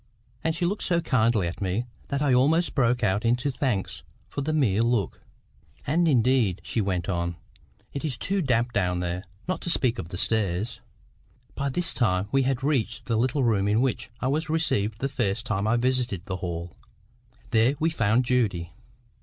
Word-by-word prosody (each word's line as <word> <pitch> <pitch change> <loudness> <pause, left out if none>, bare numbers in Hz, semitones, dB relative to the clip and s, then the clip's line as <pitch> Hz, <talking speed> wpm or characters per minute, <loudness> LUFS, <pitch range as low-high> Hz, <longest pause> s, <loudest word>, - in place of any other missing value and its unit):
And 160 0 0
she 175 - 0
looked 200 +4 -1
so 175 -1 +2
kindly 115 - +2
at 85 - -6
me, 100 +5 -1 0.2
that 140 +1 -1
I 140 -3 +3
almost 155 +7 +3
broke 125 -3 +2
out 100 +1 +1
into 125 +4 +1
thanks 125 -8 -2 0.3
for - - -4
the 155 +3 -1
mere 120 -10 +2
look. 115 -5 0 0.6
"And 165 +5 +2
indeed," 125 - +3
she 115 - -1
went 90 -3 -1
on, 85 -2 -1 0.6
"it 140 - -4
is 140 -6 -1
too 195 +6 -1
damp 120 -4 +1
down 90 -3 +1
there, 90 +1 -3 0.2
not 185 - -2
to - - -3
speak 125 -7 +1
of 80 - -5
the 90 - -5
stairs." 105 0 0 0.7
By 140 0 -2
this 170 +6 -1
time 100 -5 +1
we 135 - +3
had 130 -1 0
reached 140 -6 0
the 115 - 0
little 130 +4 +1
room 105 -4 +2
in 105 +2 +3
which 130 0 -1
I - - -1
was 155 +3 -1
received 110 -10 0
the 135 - +1
first 110 -5 -1
time 105 -1 -1
I 120 +2 +3
visited 125 -7 0
the 95 -3 -3
Hall. 85 -1 -5 0.8
There 115 +5 +4
we 160 +1 +2
found 115 -2 +2
Judy. 100 -10 0
120 Hz, 185 wpm, -26 LUFS, 100-135 Hz, 0.8 s, There